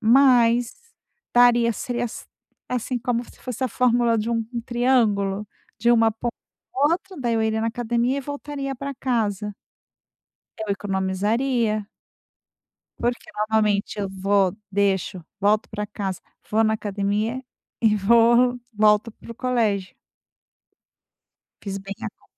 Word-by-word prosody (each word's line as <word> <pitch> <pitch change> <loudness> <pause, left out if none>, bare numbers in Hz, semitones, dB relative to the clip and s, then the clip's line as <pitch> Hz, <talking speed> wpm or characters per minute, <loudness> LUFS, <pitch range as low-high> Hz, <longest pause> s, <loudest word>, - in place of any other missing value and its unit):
mas 240 -1 +5 0.6
daria, 240 -1 +5
seria 240 +2 -3
as 235 - -6 0.4
assim 250 0 -2
como 240 0 -1
se - - -18
fosse 255 0 -4
a 255 - 0
fórmula 240 0 +2
de 225 +2 -1
um 230 -1 0 0.2
triângulo, 215 -5 +1 0.3
de 235 +3 +3
uma 225 -1 +5
ponta 230 +2 -4 0.4
à 280 +3 +3
outra, 375 +2 -4
daí 240 -2 0
eu 225 - +1
iria 220 0 0
na 225 - 0
academia 240 +2 0
e - - -2
voltaria 285 0 -5
pra 275 +2 -5
casa. 210 -6 -1 1.0
Eu 215 -2 -1
economizaria 210 +4 0 1.1
porque 240 +7 -2
normalmente 210 -1 +1
eu 200 - -1
vou, 195 0 +1
deixo, 190 -3 0 0.2
volto 210 +2 +2
para 210 0 -4
casa, 195 -3 -4 0.3
vou 220 +1 +3
na 220 0 +2
academia 210 +4 -2 0.4
e 220 -2 +4
vou 235 +4 +4
volto 210 +1 +3
pro 230 - -11
colégio. 225 -6 0 1.7
Fiz 195 -1 -5
bem 195 0 -7
a - - -2
conta. - - -41
225 Hz, 130 wpm, -23 LUFS, 205-245 Hz, 1.7 s, mas